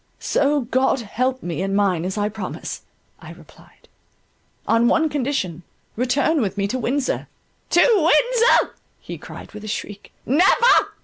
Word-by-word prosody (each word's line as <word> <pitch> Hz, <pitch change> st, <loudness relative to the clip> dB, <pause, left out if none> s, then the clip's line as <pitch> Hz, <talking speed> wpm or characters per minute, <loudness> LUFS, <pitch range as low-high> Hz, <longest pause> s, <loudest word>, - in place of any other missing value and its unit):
"So 285 Hz, 0 st, +1 dB
God 260 Hz, +1 st, 0 dB
help 255 Hz, +4 st, -2 dB
me 170 Hz, -1 st, -4 dB
and 195 Hz, +1 st, -1 dB
mine 190 Hz, -5 st, +1 dB
as 190 Hz, +3 st, -4 dB
I 205 Hz, 0 st, 0 dB
promise," 210 Hz, -3 st, -6 dB, 0.4 s
I -, -, -11 dB
replied, -, -, -20 dB, 0.8 s
"on 230 Hz, +1 st, +3 dB
one 320 Hz, +5 st, +2 dB
condition: 260 Hz, -, -2 dB, 0.3 s
return 265 Hz, +6 st, +1 dB
with 200 Hz, -2 st, -2 dB
me 200 Hz, 0 st, 0 dB
to 255 Hz, -, -2 dB
Windsor." 260 Hz, +3 st, -2 dB, 0.4 s
"To 350 Hz, -, +4 dB
Windsor!" 470 Hz, +4 st, +3 dB, 0.3 s
he -, -, -9 dB
cried -, -, -11 dB
with 210 Hz, -1 st, -10 dB
a -, -, -7 dB
shriek, 205 Hz, -1 st, -6 dB
"Never! 375 Hz, -, +4 dB
250 Hz, 145 wpm, -21 LUFS, 205-290 Hz, 0.8 s, To